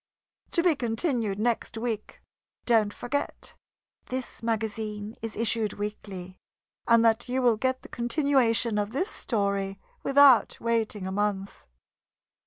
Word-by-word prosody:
TO 340 - +1
BE 350 -4 +4
CONTINUED 230 - -1
NEXT 230 +1 -1
WEEK. 225 -2 -4 0.4
Don't 220 -4 +3
forget 285 +7 -4 0.5
this 255 -2 -5
magazine 220 -1 -3
is 225 -1 -4
issued 225 -1 +2
weekly, 195 -3 -6 0.5
and 230 -1 +5
that 230 +2 +2
you 255 +1 0
will 245 -3 +4
get 260 +3 -1
the - - -10
continuation 240 -4 +1
of 205 +2 -2
this 365 +10 -1
story 200 -3 -1 0.2
without 275 -5 +5
waiting 225 -4 -1
a 190 - -3
month. 200 -1 -2
225 Hz, 125 wpm, -27 LUFS, 210-245 Hz, 0.5 s, and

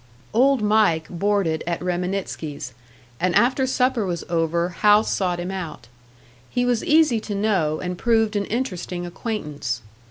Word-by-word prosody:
Old 260 0 +4
Mike 205 -7 +3
boarded 180 -3 0
at 170 -1 -1
Reminitsky's, 175 -6 -3 0.5
and 180 0 +1
after 255 +5 +3
supper 255 -2 +1
was 175 -3 -3
over, 170 +1 +1
Hal 210 +4 +4
sought 180 -5 -1
him 175 +2 -3
out. 160 -11 -6 0.6
He 245 0 0
was 245 -2 +1
easy 305 -7 +4
to 210 -1 -5
know, 190 -7 +1
and 180 0 -4
proved 225 -2 +2
an 200 -1 0
interesting 185 -7 -3
acquaintance. 150 - -4
190 Hz, 145 wpm, -23 LUFS, 170-220 Hz, 0.6 s, Old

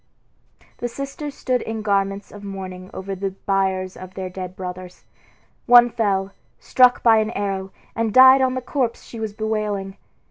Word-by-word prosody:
The 240 - -2
sisters 275 +3 -6
stood 255 -1 -1
in 220 -1 -5
garments 195 -1 -1
of 205 0 -11
mourning 185 -2 -7
over 195 +1 -6
the 190 0 -4
biers 190 -1 0
of 185 0 -11
their 185 -1 -5
dead 185 0 -7
brothers. 180 -1 -8 0.6
One 240 0 +7
fell, 195 -4 0 0.3
struck 250 -1 +4
by 225 -2 +6
an 215 0 +1
arrow, 195 -3 -3 0.3
and 225 -1 0
died 260 +3 +8
on 260 -1 +1
the 255 - -2
corpse 250 -2 -2
she 230 - -10
was 220 -2 -4
bewailing. 210 -3 -3
205 Hz, 165 wpm, -22 LUFS, 190-235 Hz, 0.6 s, died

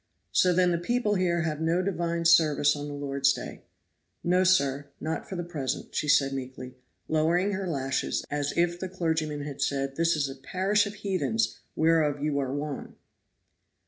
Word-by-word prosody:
"So 180 - +4
then 180 0 +3
the 170 - 0
people 225 +3 0
here 175 -3 +1
have 155 -1 -2
no 170 +3 +1
divine 170 -3 -1
service 155 -4 +5
on 145 0 -5
the 145 - -6
Lord's 140 -1 +1
day." - - -7 0.6
"No, 180 +2 +3
sir, 145 -6 +2
not 160 +1 -4
for 190 - -5
the 175 - -3
present," 145 -6 -4
said 150 - -1
Susan 135 -2 +4
meekly, 130 -1 -7 0.3
lowering 170 +5 +2
her 190 -1 -3
lashes, 135 -4 -1
as 145 0 -1
if 175 0 +1
the 185 - -4
clergyman 160 -4 -1
had 145 -2 -6
said, 135 -1 -1
"This 165 0 +3
is 145 -2 0
a 135 - -6
parish 190 +9 +1
of 205 - -7
heathens, 200 +2 -1 0.2
whereof 160 -3 +2
you 145 -1 0
are 135 -2 -2
one." 145 0 -5
160 Hz, 175 wpm, -27 LUFS, 145-180 Hz, 0.6 s, service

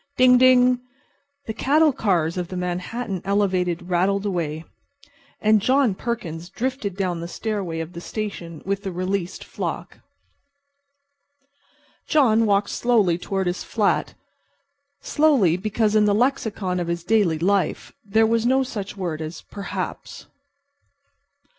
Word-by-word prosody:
Ding 250 -1 +6
ding! 250 -1 +5 0.7
The 220 - -4
cattle 300 +6 +3
cars 170 -8 0
of 180 -2 -3
the 185 - -6
Manhattan 180 +3 -3
Elevated 185 -3 0
rattled 190 +3 +1
away, 165 -5 -2 0.7
and 215 -1 +3
John 260 -1 +3
Perkins 180 -7 -5
drifted 225 -4 -3
down 180 -3 -1
the 170 - -5
stairway 185 -4 -3
of 165 +2 -7
the 170 - -7
station 175 -6 -6
with 200 +1 -1
the 195 - -4
released 185 0 -3
flock. - - -5 2.1
John 230 -7 +4
walked 200 0 +2
slowly 210 -8 +2
toward 195 +1 -2
his 175 0 -2
flat. 210 -3 0 0.9
Slowly, 275 - +3
because 215 +3 0
in 215 -1 +5
the 205 -1 +3
lexicon 220 -7 0
of 175 - -3
his 170 0 -3
daily 190 -5 +2
life 190 +1 0
there 220 +1 +3
was 230 0 +1
no 260 +2 +3
such 205 -6 -6
word 170 -5 -3
as 155 +2 -7
"perhaps." 200 -1 -6
200 Hz, 130 wpm, -23 LUFS, 175-225 Hz, 2.1 s, Ding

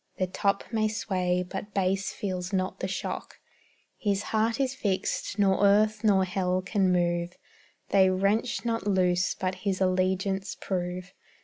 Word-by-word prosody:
The 185 - +1
top 200 +2 0
may 215 -1 +2
sway, 180 -4 -1
but 195 +2 -7
base 195 0 +1
feels 185 -2 -4
not 185 -1 -1
the 185 - -2
shock; 190 - -4 0.6
His 200 -1 0
heart 225 +2 +1
is 270 -1 +1
fixed, 200 -4 -2
nor 200 -1 +3
earth 210 +2 +4
nor 195 -3 +4
hell 185 -1 -1
can 190 -1 +1
move; 175 0 0 0.5
They 190 -1 +5
wrench 200 +7 0
not 230 -3 -1
loose, 185 -2 +2
but 185 0 -2
his 195 -2 -1
allegiance 190 +1 0
prove. 180 0 -3
190 Hz, 145 wpm, -28 LUFS, 185-205 Hz, 0.6 s, They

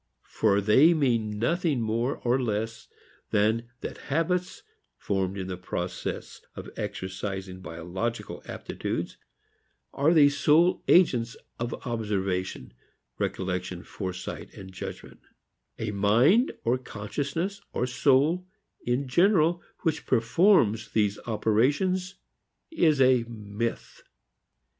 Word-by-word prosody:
For 100 -2 +2
they 135 - +6
mean 115 -8 +1
nothing 160 +3 +1
more 115 +4 -1
or 125 +2 +2
less 115 -1 -3 0.4
than 110 +3 +1
that - - -6
habits 180 - -1 0.3
formed 95 -1 -1
in 95 -1 -4
process 90 0 -5
of - - -8
exercising 95 0 -5
biological 90 +8 -4
aptitudes - - -4 0.8
are 145 +4 +3
the 150 -4 +7
sole 155 +5 +3
agents 125 -10 +4 0.2
of 120 0 -2
observation, 100 - -2 0.5
recollection, 90 -1 -3
foresight 90 -1 -6
and 95 -1 -10
judgment: 90 - -8 0.6
a 110 -1 -3
mind 115 - +4
or 120 +2 +1
consciousness 140 - -4
or 125 - -1
soul 140 +8 +2 0.4
in 125 +3 0
general 170 +3 +3 0.2
which 160 -3 -1
performs 115 - +3
these 105 -2 +1
operations 145 - +1 0.6
is 160 - +3
a 130 -2 +5
myth. 110 +1 -5
115 Hz, 100 wpm, -27 LUFS, 100-150 Hz, 0.8 s, the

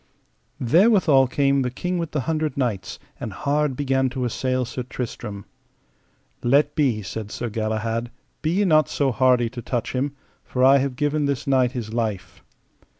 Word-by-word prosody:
Therewithal 160 - +4
came 140 +1 +2
the 125 - 0
King 180 +8 -3
with 165 -2 -3
the 150 -2 -2
Hundred 155 -1 -2
Knights, 105 -8 -2 0.2
and - - -5
hard 145 -1 0
began 135 -1 +1
to 130 0 -3
assail 130 +1 -1
Sir 125 +2 -5
Tristram. 110 -4 -6 1.0
Let 145 +4 +3
be, 130 -9 +1
said 105 +2 -6
Sir 120 - -4
Galahad, 110 +2 -2 0.3
be 155 - 0
ye 195 +5 +2
not 155 -5 +4
so 140 -2 +1
hardy 125 -1 +3
to 120 - -7
touch 120 -1 -3
him, 135 +2 -2 0.3
for 125 - -1
I 135 +1 +7
have 135 -1 -2
given 145 +2 0
this 140 -3 -2
knight 130 -2 +2
his 115 -4 -5
life. 110 -5 -3
130 Hz, 165 wpm, -23 LUFS, 120-145 Hz, 1.0 s, I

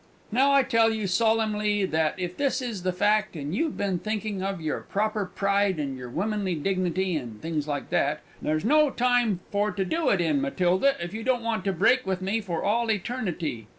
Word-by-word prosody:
"Now 270 +5 +4
I 275 -1 +5
tell 230 -3 +3
you 220 -2 -2
solimly 210 0 +1
that 160 -3 0
if 180 -1 -4
this 275 -2 0
is 235 -7 -4
the 185 +1 0
fact, 210 +2 +1
and 145 0 -4
you've 315 - -1
been 195 -3 -1
thinking 215 -1 -3
of 195 -1 -2
your 155 -2 -2
proper 215 0 -1
pride 200 0 +1
and 140 -2 -2
your 125 -1 -8
womanly 195 - -1
dignity 185 +2 0
and 120 -7 -5
things 155 0 -3
like 145 -1 -4
that 150 +2 +1 0.2
there's 155 +4 -1
no 300 +4 +5
time 245 -7 +1
for 205 +1 +1
to 195 -2 -2
do 320 - 0
it 195 - +2
in 175 - +1
Matilda, 235 -1 +2
if 170 +2 -5
you 220 - -4
don't 245 0 0
want 225 -4 -1
to 195 - +2
break 215 +8 +3
with 190 -1 0
me 195 +4 -1
for 175 -5 -3
all 230 +2 +1
Eternity! 180 - -2
200 Hz, 205 wpm, -26 LUFS, 175-225 Hz, 0.2 s, I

